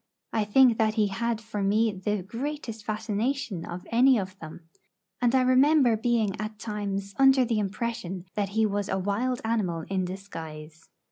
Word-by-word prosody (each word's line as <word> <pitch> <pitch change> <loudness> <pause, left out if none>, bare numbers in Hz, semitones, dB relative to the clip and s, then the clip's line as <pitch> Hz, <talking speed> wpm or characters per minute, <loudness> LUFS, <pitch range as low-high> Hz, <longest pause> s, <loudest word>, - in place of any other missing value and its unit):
I 220 -2 +1
think 235 +2 +5
that 215 -1 +2
he 210 -3 +2
had 230 +3 -1
for 220 -2 -5
me 215 +3 +2
the 200 0 -2
greatest 230 +1 -5
fascination 215 -1 -2
of 175 +1 -7
any 250 +2 +5
of 190 -2 -4
them; 160 +1 -9 0.6
and 245 +1 +3
I 260 - +5
remember 255 -1 +4
being 220 -3 0
at 215 0 -5
times 200 -2 -4
under 270 -1 +6
the 230 -2 0
impression 195 -3 -3
that 205 -2 -1
he 220 +2 +2
was 205 -1 -1
a 190 - 0
wild 210 +7 -1
animal 200 -8 0
in 190 -1 +1
disguise. 165 -4 -9
215 Hz, 165 wpm, -27 LUFS, 195-235 Hz, 0.6 s, under